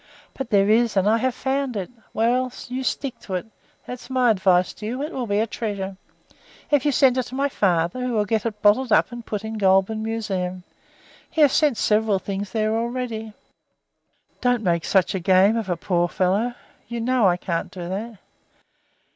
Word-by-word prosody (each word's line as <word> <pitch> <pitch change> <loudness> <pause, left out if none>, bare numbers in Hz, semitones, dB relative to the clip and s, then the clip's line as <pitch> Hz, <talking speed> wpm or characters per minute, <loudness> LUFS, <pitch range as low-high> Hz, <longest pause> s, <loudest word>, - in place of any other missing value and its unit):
"But 270 -3 -5
there 200 -2 +4
is, 225 0 +3
and 190 +1 +3
I 220 +2 +4
have 255 0 0
found 265 -3 -1
it." 190 +1 -4 0.2
"Well, 245 +3 +1 0.2
you 255 +1 -4
stick 260 0 -3
to 190 - -5
it 180 - -3 0.4
that's 250 0 -8
my 255 -2 +3
advice 185 -3 +2
to 210 - -9
you. 255 +5 -3
It 300 - -4
will 250 -3 -3
be 205 0 0
a 220 - +2
treasure. 200 -4 -4 0.8
If 290 -1 +3
you - - +3
send 260 -1 +4
it - - +1
to 255 - -8
my 280 +1 +1
father 180 +2 0
he - - -1
will 215 -3 +1
get 220 -1 0
it 210 -2 -7
bottled 220 +4 +4
up - - +4
and 240 0 -7
put 210 -2 -4
it 220 - -5
in - - -5
the 220 - -5
Goulburn 195 +2 +3
museum. 195 -5 -3 0.7
He 320 - -1
has 290 -3 +6
sent 295 -7 +3
several 215 -1 +2
things 195 +1 -4
there 215 -1 0
already." 230 -2 -3 1.1
"Don't 245 -2 +1
make 170 -3 +1
such 190 -3 +2
a 190 - -1
game 190 +4 +4
of 225 -4 -3
a 175 - 0
poor 175 0 +1
devil. 200 +8 0 0.3
You 235 +1 -4
know 240 -2 +2
I 175 -1 +2
can't 170 -2 -3
do 180 -2 -7
that." 210 +4 -5
220 Hz, 205 wpm, -23 LUFS, 195-245 Hz, 1.1 s, has